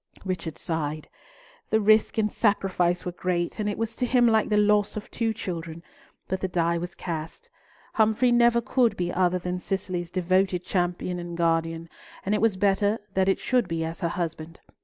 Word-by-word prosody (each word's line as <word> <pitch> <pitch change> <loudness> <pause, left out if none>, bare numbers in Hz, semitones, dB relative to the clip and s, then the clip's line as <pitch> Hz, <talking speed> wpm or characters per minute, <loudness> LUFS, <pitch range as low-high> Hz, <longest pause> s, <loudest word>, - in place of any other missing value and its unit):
Richard 180 -4 -4
sighed. 155 -2 -3 0.6
The 220 - +3
risk 215 +1 +3
and 210 -1 +1
sacrifice 185 -4 +1
were 180 - -2
great, 175 +2 -2
and 210 -1 0
it 205 - -3
was 225 0 -3
to 250 - 0
him 245 -1 +4
like 220 -2 +3
the 210 - +2
loss 210 0 +3
of 210 - -7
two 230 -1 0
children, 170 -6 -6 0.4
but 190 0 -2
the 190 - 0
die 170 -1 0
was 175 +1 -6
cast; 170 - -6 0.4
Humfrey 220 +3 +3
never 235 0 +4
could 235 -3 +1
be 175 0 -2
other 180 0 +2
than 180 0 -3
Cicely's 180 -2 -3
devoted 185 0 +1
champion 180 -1 -1
and 175 -1 -6
guardian, 165 0 0 0.4
and 200 - +1
it 210 - +1
was 220 -4 +2
better 205 +2 +2 0.2
that 190 0 +2
it 195 - +2
should 250 -6 +1
be 165 -1 -2
as 165 +2 -6
her 170 -3 -1
husband. 165 -2 -5
185 Hz, 185 wpm, -26 LUFS, 170-215 Hz, 0.6 s, him